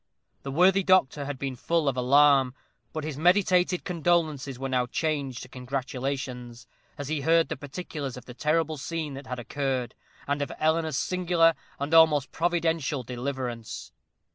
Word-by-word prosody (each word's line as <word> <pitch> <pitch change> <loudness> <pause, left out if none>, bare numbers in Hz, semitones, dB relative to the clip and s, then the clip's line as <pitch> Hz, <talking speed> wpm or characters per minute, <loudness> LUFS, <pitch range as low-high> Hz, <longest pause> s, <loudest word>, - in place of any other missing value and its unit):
The 140 - -6
worthy 180 +7 +4
doctor 180 -7 +3
had 145 -1 -4
been 135 -1 -4
full 165 +4 0
of 135 - +1
alarm; 135 0 +4 0.4
but 155 - -4
his 150 -2 -5
meditated 180 +1 +3
condolences 160 -6 0
were 135 +1 -3
now 125 -2 0
changed 140 -3 -2
to - - -10
congratulations, 125 -1 -4 0.3
as 145 -2 -5
he 155 -1 -1
heard 165 +3 +3
the 155 - -2
particulars 145 -2 -6
of 125 - -11
the 125 - -9
terrible 155 +3 0
scene 155 0 -4
that 135 0 -9
had 125 - -4
occurred, 130 0 -2 0.3
and 145 +1 -1
of 140 - -2
Eleanor's 160 -2 +1
singular 175 -2 +3 0.2
and 140 +3 -3
almost 155 -4 +5
providential 165 -5 0
deliverance. 125 -2 -5
145 Hz, 155 wpm, -27 LUFS, 130-165 Hz, 0.4 s, almost